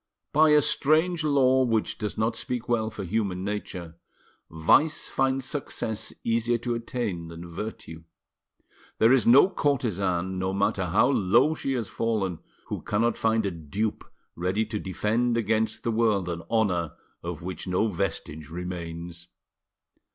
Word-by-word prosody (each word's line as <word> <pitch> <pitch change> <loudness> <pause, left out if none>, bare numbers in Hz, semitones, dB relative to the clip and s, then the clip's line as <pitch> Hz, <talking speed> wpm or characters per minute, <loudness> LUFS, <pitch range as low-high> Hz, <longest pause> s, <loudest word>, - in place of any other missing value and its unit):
By 155 +1 +6
a 150 -1 +6
strange 155 +3 +2
law 130 -3 +4
which 115 -3 0
does 105 -3 -3
not 110 +1 0
speak 125 +1 -4
well 110 -2 +1
for 105 -2 -6
human 95 -1 -1
nature, 90 -5 -5 0.5
vice 115 - +3
finds 135 -1 0
success 120 -6 -4
easier 115 +1 +1
to 120 +1 -2
attain 115 -7 -3
than 85 +1 -9
virtue. 85 -3 -7 0.9
There 115 +3 +5
is 130 -5 +3
no 130 +9 +8
courtesan, 95 - 0
no 95 +1 -1
matter 100 -1 +1
how 105 +9 +3
low 105 +7 +3
she 135 -3 -2
has 120 -5 -2
fallen, 105 -7 -1 0.3
who - - -5
cannot 115 +2 +1
find 110 -1 +1
a 100 - 0
dupe 95 +7 -3 0.3
ready 95 +6 0
to 110 -1 -4
defend 115 +5 0
against 110 0 0
the 115 - 0
world 110 -5 +2
an 85 -1 -3
honour 90 -8 +1 0.3
of - - -6
which 95 +1 -6
no 90 +4 +1
vestige 80 -5 -4
remains. 85 0 -6
110 Hz, 145 wpm, -26 LUFS, 90-120 Hz, 0.9 s, no